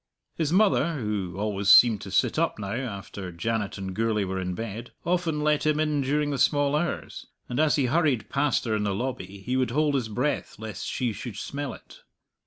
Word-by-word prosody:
His 160 -2 -1
mother 180 -4 +3
(who 105 - -3
always 100 -1 -1
seemed 115 -4 +8
to 95 - -7
sit 95 - +2
up 165 -1 +1
now, 100 -1 -4
after 100 -6 -5
Janet 105 +4 -2
and 95 -1 -5
Gourlay 110 0 +1
were 95 0 -2
in 90 0 -3
bed) 115 +2 -5 0.2
often 170 -3 0
let 150 0 +2
him 155 0 +2
in 150 -2 +1
during 145 +2 0
the 140 - -2
small 145 +1 +3
hours, 170 +3 -3 0.2
and 125 - -3
as 155 -1 +4
he 140 - +2
hurried 140 -3 +1
past 140 -2 +1
her 110 -2 0
in 105 - 0
the 100 -2 0
lobby 100 -5 -5
he 125 - -1
would 130 -2 +1
hold 150 +4 +1
his 125 -5 0
breath 125 +7 -1
lest 110 -3 -6
she 125 -4 -1
should 105 +1 -7
smell 140 +5 -4
it. - - -16
120 Hz, 205 wpm, -26 LUFS, 105-150 Hz, 0.2 s, seemed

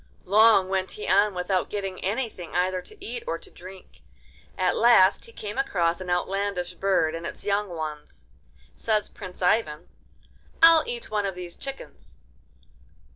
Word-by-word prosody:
Long 210 0 +5
went 190 0 -2
he 210 - -7
on 200 0 +3
without 180 +1 -1
getting 195 -2 -5
anything 200 -4 -3
either 185 +1 +1
to 400 - -13
eat 465 +2 -5
or - - -1
to 395 - -15
drink. 185 +1 -13 0.6
At 185 -1 +1
last 210 -5 +5
he 460 - -14
came 215 - -6
across 175 -8 0
an 180 - -6
outlandish 180 0 -1
bird 180 -4 +1
and 165 0 -6
its - - -7
young 205 0 0
ones. 155 -3 -7 0.5
Says 215 -2 -1
Prince 185 -3 -9
Ivan: 180 -5 +1 0.8
'I'll 330 -1 +8
eat 475 - -5
one 205 -2 0
of 190 - -5
these 180 -1 -8
chickens. 70 - -9
190 Hz, 155 wpm, -25 LUFS, 180-215 Hz, 0.8 s, I'll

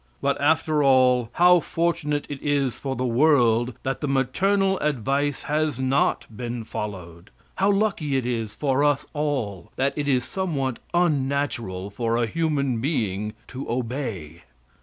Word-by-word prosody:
But, 140 0 0
after 155 0 +2
all, 130 -3 +4
how 180 +1 +6
fortunate 165 -3 -1
it 145 -2 -7
is 140 -4 +1
for 135 -1 -4
the 125 - -2
world 120 -3 +3
that 135 0 -2
the 150 - -1
maternal 190 +9 +1
advice 140 0 -1
has 150 -3 -1
not 130 +2 +1
been 120 0 -4
followed! 90 -5 -7 0.3
How 195 +1 +3
lucky 195 -9 0
it 130 - -1
is 115 -3 -3
for 140 +1 +1
us 145 -2 +2
all 135 - -2
that 135 +1 0
it 145 -1 -2
is 130 -3 +2
somewhat 140 -7 -2 0.2
unnatural 135 - 0
for 115 +2 -1
a 120 - +2
human 140 -3 -1
being 105 - -1
to 135 +1 -7
obey! 115 - -4
135 Hz, 145 wpm, -24 LUFS, 120-150 Hz, 0.3 s, how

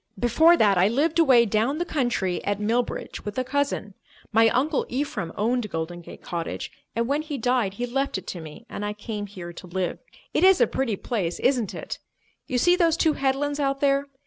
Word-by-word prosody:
"Before 315 - +5
that, 200 - +4
I 185 - +5
lived 300 +9 +1
away 260 -7 +6
down 225 +7 +1
the 345 - -1
country 240 - -1
at 205 0 -1
Millbridge 230 +3 -2
with 210 +2 -6
a 255 - +1
cousin. 270 -6 -1 0.4
My 225 +1 +5
Uncle 280 +5 +1
Ephraim 240 - -3
owned 230 +1 0
Golden 165 +1 -4
Gate - - -12
Cottage, 170 -2 -4 0.2
and 230 0 0
when 285 +3 +1
he 305 -2 -5
died 245 -5 +1
he 245 - -2
left 270 +1 -1
it 190 - -8
to 175 - -6
me 160 +9 -11
and 205 - -6
I 205 0 -2
came 210 0 -5
here 175 -3 -8
to 180 - -10
live. 180 0 -2 0.3
It - - +2
is 380 -1 +7
a - - +6
pretty 255 -6 -1
place, 190 -5 -2
isn't 245 -7 +1
it? - - -6 0.5
You 255 - -1
see 350 +8 +4
those 335 -3 +3
two 320 -3 +3
headlands 280 +2 0
out 275 -1 0
there? 280 0 +2
240 Hz, 205 wpm, -25 LUFS, 205-280 Hz, 0.5 s, is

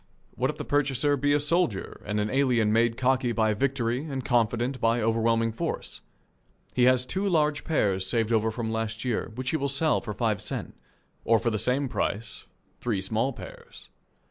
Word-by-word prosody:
What - - 0
if - - -4
the - - -5
purchaser 145 0 +1
be 145 +1 +1
a 145 - +4
soldier 150 - 0
and 105 0 -1
an 105 +1 -1
alien 125 -6 +2
made 115 0 +2
cocky 130 -1 +1
by 110 -1 +2
victory 125 +1 -1
and 135 -4 -5
confident 120 +2 0
by 115 +1 +2
overwhelming 115 0 +1
force? 110 - -4 0.7
He 125 - +3
has 130 0 +4
two 195 +8 -1
large 150 -4 +1
pears 95 - 0
saved 115 +2 0
over 110 0 +2
from 110 0 -3
last 110 +1 -3
year 120 -2 -1
which 130 +1 -3
he 160 - +1
will 140 -1 -1
sell 145 +3 +1
for 105 -4 -6
five 110 -3 0
sen, - - -4 0.5
or 115 - +4
for 115 +2 0
the 110 - -1
same 130 +5 +2
price 110 -3 -3 0.3
three 115 -5 -1
small 110 +7 -1
pears. - - -12
120 Hz, 185 wpm, -27 LUFS, 110-135 Hz, 0.7 s, a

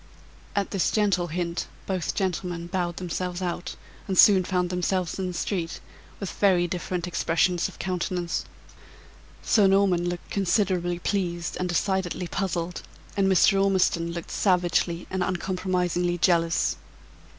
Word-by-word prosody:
At 200 -1 0
this 190 -5 +1
gentle 200 -5 +1
hint, 170 +1 -3 0.2
both 185 -3 -2
gentlemen 180 -2 -2
bowed 175 -1 -2
themselves 180 0 -3
out, 175 -1 -3 0.3
and 190 -2 -1
soon 190 -1 +7
found 180 0 -1
themselves 180 0 -1
in 190 - -1
the 180 - -4
street, 170 -3 -2 0.4
with 195 - -4
very 185 -3 +3
different 175 0 -3
expressions 175 0 +1
of - - -12
countenance. 180 -1 -2 1.0
Sir 205 -3 +4
Norman 190 -3 +3
looking 175 0 -6
considerably 185 -2 +1
pleased 175 -2 -2
and 180 0 -1
decidedly 180 0 -1
puzzled, 175 -2 -2 0.3
and 195 -1 +2
Mr. 195 +1 +5
Ormiston 180 -3 +2
looking 170 0 -6
savagely 175 -2 +1
and 190 -1 -1
uncompromisingly 180 -1 0
jealous. 170 -1 +2
180 Hz, 130 wpm, -26 LUFS, 175-190 Hz, 1.0 s, soon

